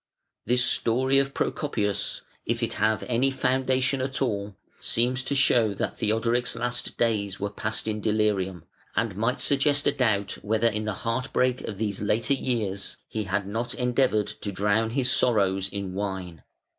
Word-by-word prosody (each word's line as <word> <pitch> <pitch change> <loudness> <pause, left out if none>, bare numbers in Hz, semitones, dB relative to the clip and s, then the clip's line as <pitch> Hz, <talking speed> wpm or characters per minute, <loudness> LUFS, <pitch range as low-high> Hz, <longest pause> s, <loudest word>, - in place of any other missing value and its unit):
] - - -58
This 125 +1 +3
story 130 +4 +2
of 140 0 -1
Procopius, 105 -9 -1 0.2
if - - 0
it - - 0
have 110 0 +2
any 125 +2 +2
foundation 130 0 +1
at 130 0 -2
all, 105 -6 -1 0.2
seems 125 +2 0
to 140 - +1
show 120 -6 +3
that - - -3
Theodoric's 115 +3 0
last 120 +1 -2
days 105 -4 0
were 100 0 -2
passed 110 +1 -3
in 105 -1 -2
delirium, 100 -5 0 0.3
and 115 -4 0
might 115 +6 0
suggest 145 0 +3
a - - +5
doubt 110 -8 0
whether 110 +2 0
in 110 -1 -1
the 105 - -1
heart 120 +3 -1
break 125 0 +2
of 105 - -5
these 100 -2 -2
later 110 +5 +1
years 110 -8 -2
he 110 -1 -3
had 100 +1 -1
not 115 +4 -3
endeavoured 125 -4 +2
to 100 0 -5
drown 105 +3 +1
his 125 +1 +1
sorrows 95 -6 +2
in 100 -2 -5
wine. 95 -5 -4
110 Hz, 170 wpm, -26 LUFS, 100-125 Hz, 0.3 s, a